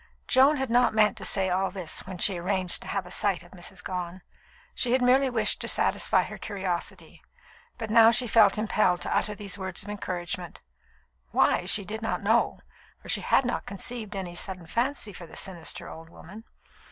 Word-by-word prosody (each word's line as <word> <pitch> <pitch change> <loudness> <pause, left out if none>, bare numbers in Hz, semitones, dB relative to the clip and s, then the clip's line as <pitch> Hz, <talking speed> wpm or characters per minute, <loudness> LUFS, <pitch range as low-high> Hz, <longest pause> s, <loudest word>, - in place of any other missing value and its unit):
Joan 275 +3 +5
had 265 -3 -3
not 245 -2 +3
meant 210 -1 +4
to - - -5
say 190 -2 +2
all 190 +1 +1
this 180 -2 -3
when 185 -1 -7
she 180 0 +2
arranged 185 0 +1
to - - -9
have 195 -2 -3
a 180 - -11
sight 195 -2 +1
of 175 - -18
Mrs. 185 0 -6
Gone. 180 0 -5 0.5
She 245 -1 0
had 260 - +3
merely 260 +2 +4
wished 230 -3 0
to - - -3
satisfy - - +3
her - - -9
curiosity; 180 -3 -5 0.6
but 225 -3 -5
now 225 0 +7
she 240 +2 +3
felt 215 -4 +4
impelled 210 -4 +1
to - - -1
utter 210 - -1
these 205 -1 -6
words 190 -1 -3
of 205 - -10
encouragement 180 -3 -5 0.7
why, 175 - +2
she 200 +2 +2
did 220 +3 -6
not 225 - -3
know, 220 +4 +1 0.4
for - - -14
she - - 0
had 265 - +2
not 245 - -3
conceived 210 +2 -4
any 185 -3 -5
sudden 180 0 -3
fancy 235 - -2
for 175 -1 -10
the - - -13
sinister 175 -4 -3
old 165 0 -11
woman. 205 +7 -13
195 Hz, 195 wpm, -27 LUFS, 180-225 Hz, 0.7 s, now